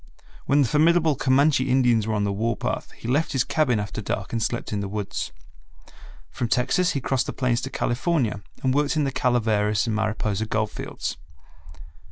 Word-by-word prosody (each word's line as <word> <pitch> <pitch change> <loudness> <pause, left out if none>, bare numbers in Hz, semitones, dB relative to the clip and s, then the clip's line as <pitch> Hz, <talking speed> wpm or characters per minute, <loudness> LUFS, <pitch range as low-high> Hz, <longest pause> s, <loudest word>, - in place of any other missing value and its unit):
When 145 +1 +4
the - - +1
formidable 160 +3 +4
Comanche 135 +1 +3
Indians 120 -4 +3
were 110 - 0
on 105 - 0
the 100 - 0
war 115 +2 -1
path - - -3
he - - -9
left 145 +6 +1
his 130 -2 +2
cabin 135 -8 +1
after 105 +1 -4
dark 105 +1 -4
and 115 - -1
slept 120 0 -2
in 105 - -1
the 100 - -3
woods. 105 0 -4 1.0
From 120 - -2
Texas 135 +10 +2
he 140 - -1
crossed 135 0 0
the - - -3
plains 125 -2 0
to 135 - -4
California 125 -4 0 0.2
and 130 -1 +2
worked 145 +2 +1
In 155 - +2
the 135 - 0
Calaveras 110 -5 +1
and 115 -2 -1
Mariposa 110 -1 -1
gold 110 -1 -1
fields. - - -5
120 Hz, 190 wpm, -24 LUFS, 110-140 Hz, 1.0 s, When